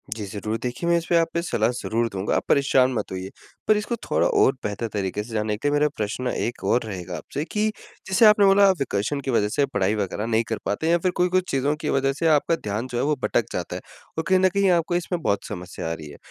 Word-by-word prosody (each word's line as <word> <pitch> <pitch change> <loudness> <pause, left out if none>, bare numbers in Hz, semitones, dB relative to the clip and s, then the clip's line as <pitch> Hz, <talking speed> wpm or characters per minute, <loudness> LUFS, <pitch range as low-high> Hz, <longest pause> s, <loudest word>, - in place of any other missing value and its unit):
जी, 110 -2 -5
ज़रूर। 105 +3 -4
देखिए, 125 +7 -3
मैं 170 - +4
इसपे 170 +1 0
आप 165 -1 +3
पे 170 - 0
सलाह 115 -9 0
ज़रूर 115 +1 0
दूँगा। 100 0 -2
आप - - 0
परेशान 135 -2 +4
मत 115 - -3
होइए। 95 0 -5 0.4
पर 215 - +5
इसको 210 +3 -2
थोड़ा - - +2
और 135 - +4
बेहतर 105 +3 -3
तरीके 100 0 -2
से 115 +1 -11
जान 105 -1 -1
लेते, 110 +7 -1
मेरा 145 +1 +3
प्रश्न 110 +4 -2
एक 120 -1 -3
और 125 - +3
रहेगा 90 -5 -6
आपसे 145 - -5
कि 210 +4 0 0.4
जैसे 190 +4 +4
आपने 210 -1 +7
बोला 195 +1 +6
आप 190 - +4
वेकेशन 135 +2 -1
की 135 - -2
वजह 105 -3 +2
से 145 - +3
पढ़ाई 105 -6 0
वग़ैरह 105 0 -2
नहीं 115 0 +1
कर 110 -1 -3
पाते 130 +11 -1
या 170 - +5
फ़िर 180 +2 0
कोई 180 0 +2
कुछ 185 0 0
चीज़ों 140 +2 +1
की 150 - -2
वजह 135 0 +1
से 165 +4 -1
आपका 155 +1 +3
ध्यान 105 -3 -4
जो 125 -2 -4
है - - +1
वो 150 +1 +1
भटक - - +1
जाता - - -3
है। - - -5 0.4
और 160 - 0
कहीं 190 0 +4
न 185 0 +4
कहीं 200 +1 +2
आपको 175 0 +1
इसमें 175 0 -2
बहुत 100 -8 0
समस्या 90 -2 -6
आ - - 0
रही 80 -2 -8
है। 75 - -11
130 Hz, 260 wpm, -24 LUFS, 105-170 Hz, 0.4 s, आपने